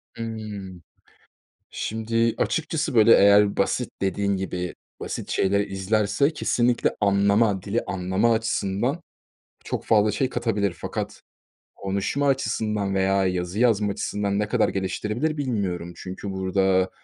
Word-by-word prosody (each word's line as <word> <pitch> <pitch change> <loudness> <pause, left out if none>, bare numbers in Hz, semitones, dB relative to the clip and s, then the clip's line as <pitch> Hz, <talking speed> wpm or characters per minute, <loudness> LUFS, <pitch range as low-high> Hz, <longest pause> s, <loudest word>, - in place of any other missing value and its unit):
Hımm. 105 -5 -6 0.9
Şimdi 115 +1 -1
açıkçası, 155 -3 -1
böyle, 115 0 +6
eğer 100 0 +5
basit, 120 +5 0
dediğin 100 +1 0
gibi, 90 -2 -4 0.2
basit - - -5
şeyler 100 +1 +2
izlerse 100 - 0
kesinlikle 120 -5 +1
anlama, 100 0 +3
dili 105 +4 -1
anlama 95 +5 +1
açısından 110 - -1 0.6
çok - - -4
fazla 105 -1 +4
şey 130 +5 0
katabilir 110 -6 -1
fakat - - -5 0.5
konuşma 100 +9 -1
açısından 105 -6 0
veya 95 0 +2
yazı 90 +1 -2
yazma 110 -4 +3
açısından 100 0 -2
ne 105 0 -1
kadar 115 0 +2
geliştirebilir 105 +10 -2
bilmiyorum. 100 - -2
Çünkü 95 +2 -7
burada, 95 0 +1
100 Hz, 115 wpm, -24 LUFS, 95-115 Hz, 0.9 s, böyle